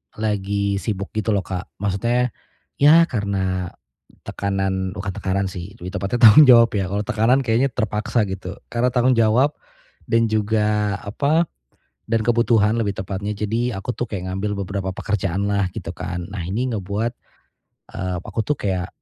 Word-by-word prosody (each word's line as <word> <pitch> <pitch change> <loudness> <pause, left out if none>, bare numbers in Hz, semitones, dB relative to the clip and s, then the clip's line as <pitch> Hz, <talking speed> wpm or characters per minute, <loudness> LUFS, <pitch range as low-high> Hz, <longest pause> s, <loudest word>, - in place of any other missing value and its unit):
lagi 100 -2 -1
sibuk 100 -3 -4
gitu 110 -1 0
loh 95 - 0
Kak, 90 -1 -5 0.2
maksudnya 120 +5 0 0.5
ya 155 +4 +7
karena 95 -5 -1 0.5
tekanan 95 -1 -2
bukan 100 0 -4
tekanan 95 +1 -1
sih, 95 +4 -8
lebih 90 - -4
tepatnya 115 +5 -2
tanggung 150 +4 +8
jawab 115 -2 +7
ya. 95 -2 0
Kalau 105 +1 -1
tekanan 120 +4 +2
kayaknya 120 +3 +2
terpaksa 110 +1 0
gitu. 95 0 -6 0.2
Karena 120 +1 +1
tanggung 125 0 +3
jawab, 120 +6 +4 0.6
dan 115 -1 +3
juga, 105 -1 +1
apa, 145 +10 +1 0.6
dan 115 -1 +2
kebutuhan 115 -2 +3
lebih 100 -3 -1
tepatnya. 95 +2 -3
Jadi 115 +3 -1
aku 95 +6 -4
tuh 120 - -2
kayak 95 -3 -4
ngambil 100 +1 -2
beberapa 95 0 -3
pekerjaanlah 100 0 -1
gitu - - -5
kan, 90 -1 -5
nah 95 -3 -4
ini 120 +8 -1
ngebuat, 105 +3 -2 0.8
eee, 90 -2 -2
aku - - -3
tuh 150 - +1
kayak 95 -3 -2
105 Hz, 150 wpm, -21 LUFS, 95-115 Hz, 0.8 s, tanggung